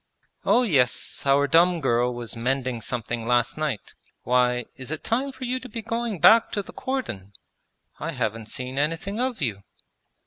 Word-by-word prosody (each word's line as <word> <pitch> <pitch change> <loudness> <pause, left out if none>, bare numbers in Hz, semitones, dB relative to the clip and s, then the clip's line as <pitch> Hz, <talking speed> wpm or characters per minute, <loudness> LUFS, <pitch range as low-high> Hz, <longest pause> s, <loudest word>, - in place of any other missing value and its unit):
'Oh 250 - +5
yes, 135 - +1
our 140 +1 +5
dumb 170 +3 +4
girl 125 -3 +2
was 120 -2 -6
mending 125 0 -1
something 115 0 -3
last 120 0 +2
night. 150 -8 -3 0.3
Why, 125 0 +2
is 130 -1 -9
it 155 0 -5
time 260 +5 0
for 260 0 -10
you 255 +1 -1
to 255 0 -10
be 230 0 -6
going 230 -2 -2
back 225 +8 +7
to 205 - -1
the - - -12
cordon? 120 - -4 0.7
I - - -3
haven't 110 0 -2
seen 130 +3 -4
anything 165 +8 -1
of 250 - -1
you!' 105 -6 -2
135 Hz, 170 wpm, -25 LUFS, -, 0.7 s, back